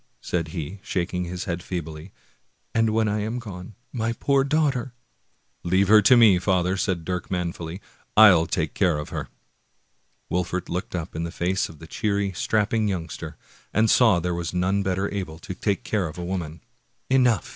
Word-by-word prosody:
" - - -44
said 85 -2 0
he, 85 +3 -6
shaking 90 -1 -2
his 90 +1 -5
head 85 0 -3
feebly, 80 -1 -6 0.3
" - - -44
and 115 -1 +3
when 110 0 +1
I 105 +1 0
am 110 +3 -2
gone, 100 -4 -8 0.2
my 115 -2 -1
poor 140 +3 +2
daughter 135 -4 0 0.3
" - - -45 0.3
"Leave 95 +3 +2
her 110 0 +8
to 125 +5 +6
me, 105 -6 +6
father!" 90 -1 +1
said 95 -4 -1
Dirk 90 0 -3
manfully; 90 0 -4 0.4
"I'll 95 -7 +8
take 80 -2 -1
care 90 -6 +2
of 75 - -5
her! - - -5 0.5
" - - -44
Wolfert 90 0 -2
looked 90 +1 -3
up 85 -3 -5
in 80 - -2
the 85 - -3
face 90 +2 -1
of 80 - -12
the 80 - -11
cheery, 100 +3 -1
strapping 110 +3 +1
youngster, 80 -4 -5 0.4
and 110 0 +4
saw 110 -8 +5
there 90 +1 -2
was 85 0 -4
none 95 +3 +1
better 95 0 0
able 90 -6 -4
to 85 - -7
take 100 +1 -1
care 100 -5 -1
of 75 - -9
a 90 - -4
woman. 85 -4 -4 0.5
Exhausted. 125 -7 +3
95 Hz, 190 wpm, -24 LUFS, 85-105 Hz, 0.5 s, her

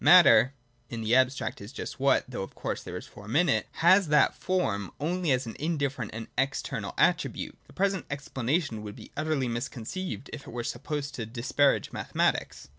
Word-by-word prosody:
Matter, 140 -6 +7 0.3
in 115 -2 -4
the 110 +2 +1
abstract, 130 -2 +2
is 100 +3 -8
just 135 - -6
what, 140 +1 +3
though 125 -4 -5
of 95 - -7
course - - -3
there - - -6
is - - -8
form 105 +4 -8
in 175 +3 +5
it, - - +2 0.2
has 190 +1 +7
that 150 0 +4
form 105 - -1
only 175 +3 -1
as 130 0 +2
an 115 - -6
indifferent 140 -7 -1
and 115 +1 -6
external 135 +1 -2
attribute. - - +1
The - - -17
present 195 0 0
explanation 140 -2 -1
would 105 -1 -7
be - - -12
utterly 155 -4 0
misconceived 125 +8 -4
if 145 - -8
it - - -8
were 120 0 -4
supposed 145 +3 -3
to 115 -5 -4
disparage 130 +4 +1
mathematics. - - -1
135 Hz, 185 wpm, -28 LUFS, 115-155 Hz, 0.3 s, Matter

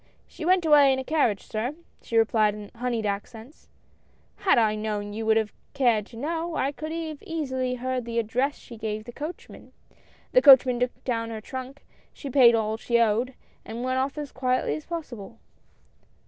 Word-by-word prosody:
" - - -37
She 320 - -5
went 365 -1 +3
away 290 -3 +6
in 265 - +1
a 265 - -3
carriage, 260 -9 +1
sir," 235 +7 -3 0.3
she 230 - -2
replied 215 -2 +3
in 210 -1 -10
honeyed 240 -2 -2
accents;" 220 +6 -6 0.7
had 385 - +3
I 220 -2 +3
known 210 -1 -3
you 220 +1 -4
would 220 0 +4
have 220 -2 -1 0.2
cared 235 -6 +2
to 230 - -13
know, 325 +5 -3
I 275 - 0
could 310 +2 -7
have 320 -3 -5
easily 260 -6 -2
heard 255 0 -3
the 235 0 -4
address 245 +6 0
she 235 - -12
gave 215 -1 -4
the 240 - -9
coachman. 305 +7 -9 0.6
The - - +5
coachman 260 - +7
took 250 0 -2
down 230 -2 -2
her 225 -1 -5
trunk, 260 +4 -8 0.3
she 280 - -8
paid 240 -3 +7
all 220 -1 -1
she 235 +1 +1
owed, 235 +3 +1 0.3
and 230 +2 -6
went 255 0 0
off 270 +3 -2
as 295 -2 -5
quietly 255 -1 0
as 310 - -7
possible." 245 - -7
250 Hz, 190 wpm, -26 LUFS, 220-280 Hz, 0.7 s, coachman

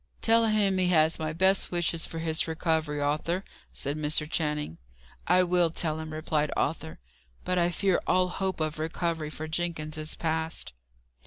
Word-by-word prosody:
"Tell 230 0 +4
him 205 -3 +2
he 185 - +2
has 160 -2 +3
my 155 -1 -2
best 190 +4 +2
wishes 175 -1 0
for 165 - -7
his 160 0 0
recovery, 160 -2 0
Arthur," 155 +6 0 0.3
said 140 +1 -1
Mr. 150 0 +1
Channing. 150 - -2 0.5
"I 180 +1 +5
will 175 -1 +3
tell 160 -1 -1
him," 160 0 -6
replied 155 -1 -1
Arthur. - - -2 0.5
"But 180 0 +1
I 170 0 +3
fear 190 +1 +1
all 185 0 +3
hope 190 0 -2
of 155 0 -2
recovery 160 -1 -2
for 155 +1 -6
Jenkins 155 -1 -3
is 155 0 -2
past." 160 - -2
160 Hz, 165 wpm, -28 LUFS, 155-180 Hz, 0.5 s, I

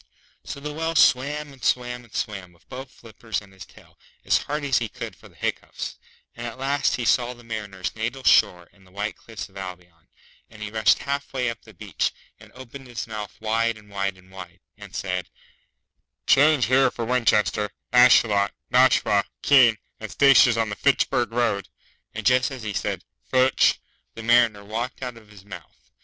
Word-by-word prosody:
So - - -7
the 150 +1 -6
Whale 165 +2 -2
swam 145 +1 +2
and 135 - -17
swam 125 0 0
and 115 - -17
swam, 95 -5 -4
with 85 - -28
both 130 +1 -8
flippers 115 -2 -6
and 100 -2 -18
his 95 -2 -12
tail, - - -20 0.3
as - - +4
hard 150 +1 -4
as 140 -2 +2
he 115 -2 -4
could - - -7
for - - -17
the - - -24
hiccoughs; - - -4 0.4
and 120 0 -6
at 120 - -8
last 140 +2 0
he 120 - -3
saw 125 +2 +2
the 120 - -16
Mariner's 105 -5 -5
natal 120 +4 -4
shore 90 -7 +4
and 95 -1 -23
the - - -22
white 105 +2 -4
cliffs 115 -2 -9
of 95 - -16
Albion, 90 -3 -10 0.4
and 110 -1 -10
he 105 - -6
rushed 110 -4 +3
half 140 0 -4
way 125 -3 0
up 115 - -11
the - - -16
beach, - - -2 0.3
and - - -16
opened 130 +1 -11
his 120 -1 -5
mouth 105 -2 -7
wide 115 +1 0
and 105 -1 -18
wide 100 -1 -2
and 95 0 -20
wide, 90 -1 -11
and 100 -2 -12
said, 90 -2 -3 1.0
'Change 145 -1 +5
here 135 +2 +4
for 115 - -5
Winchester, 105 -4 +1 0.2
Ashuelot, 115 -5 +5 0.2
Nashua, 125 -5 +4 0.2
Keene, 125 -6 +6 0.2
and 110 - -7
stations 135 -4 +5
on 115 -1 0
the 100 - -4
_Fitch_burg 130 -3 +1
Road;' 115 -4 0 0.5
and - - -5
just 125 0 +4
as 130 -4 -8
he 105 -2 -4
said - - -3 0.2
'Fitch' 130 0 +3 0.4
the 115 - -8
Mariner 115 -3 +3
walked 120 +5 -4
out 125 -1 -5
of 110 -2 -17
his 100 -2 -16
mouth. 90 -6 -13
115 Hz, 190 wpm, -24 LUFS, 100-130 Hz, 1.0 s, Keene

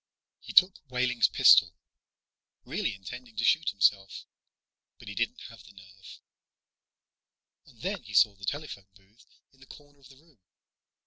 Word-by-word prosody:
He - - -11
took 185 0 +4
Wehling's 125 -1 +1
pistol, 85 -2 +5 0.9
really 110 - -3
intending 120 +5 -11
to - - -2
shoot 160 - +2
himself. 100 -1 0 0.7
But - - -17
he - - -7
didn't 115 +5 -4
have 115 - -15
the 105 - -18
nerve. 95 -1 -16 1.5
And - - -20
then - - -4
he - - -11
saw 105 - +4
the 100 0 -12
telephone 140 -7 -6
booth 95 +4 -25 0.3
in 135 - -28
the 135 - -19
corner 145 0 -17
of 135 - -19
the 135 - -19
room. 155 -5 -27
115 Hz, 150 wpm, -27 LUFS, 100-135 Hz, 1.5 s, pistol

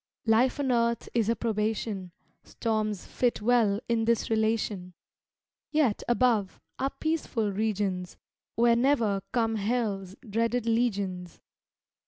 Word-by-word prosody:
Life 235 +5 +3
on 270 -2 +1
earth 235 -1 +1
is 230 -2 +1
a 230 - +2
probation; 215 -4 -2 0.3
Storms 215 -3 -2
fit 245 -2 0
well 215 -3 +3
in 230 -1 +1
this 230 0 +1
relation; 215 -5 0 0.7
Yet, 295 -9 +1
above, 240 -5 +2 0.2
are 270 - +1
peaceful 275 -10 -1
regions, 195 -3 -2 0.4
Where 235 +1 +4
ne'er 235 -6 +2
come 225 -2 +1
hell's 200 -3 -2
dreaded 230 +3 0
legions. 200 -7 -1
225 Hz, 115 wpm, -28 LUFS, 205-235 Hz, 0.7 s, Where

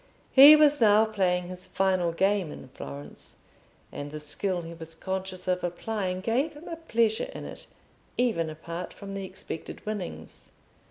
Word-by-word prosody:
He 280 +3 +11
was 295 -3 +4
now 215 0 +6
playing 185 -5 0
his 185 0 -9
final 185 -2 +1
game 190 -1 +1
in - - -10
Florence, 70 +1 -10 0.6
and 145 0 -6
the 150 +1 -6
skill 175 +4 -2
he 165 0 -8
was 165 -1 -9
conscious 190 +1 -4
of 180 0 0
applying 185 +1 -2
gave 255 +10 0
him 295 +3 -12
a 335 - -5
pleasure 230 - +1
in - - -6
it - - -9 0.5
even 220 -10 +1
apart 165 +3 -7
from 195 -1 -8
the 195 0 -4
expected 185 -3 -7
winnings. 185 - -6
190 Hz, 160 wpm, -28 LUFS, 170-220 Hz, 0.6 s, He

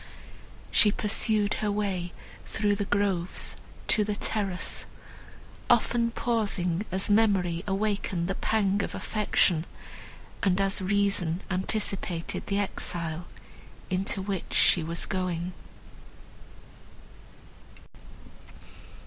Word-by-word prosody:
She 210 0 +6
pursued 210 0 +1
her 210 -1 +1
way 195 -4 -1 0.4
through 205 -1 +1
the 205 0 -2
groves 195 -3 -1 0.3
to 215 - +4
the 210 0 -2
terrace, 200 -3 -1 0.8
often 235 -1 +3
pausing 205 -6 0
as 190 +1 +1
memory 195 -5 +3
awakened 195 -3 -1
the 195 - 0
pang 200 -1 +1
of - - -4
affection, 190 -6 +2 0.8
and 190 -1 +2
as 195 0 +2
reason 195 -3 +1
anticipated 190 -2 -1
the 200 - 0
exile, 175 -4 -2 0.6
into 190 +1 0
which 195 -2 -3
she 175 - +5
was 170 +1 -2
going. 180 -2 -2
195 Hz, 95 wpm, -28 LUFS, 180-205 Hz, 0.8 s, She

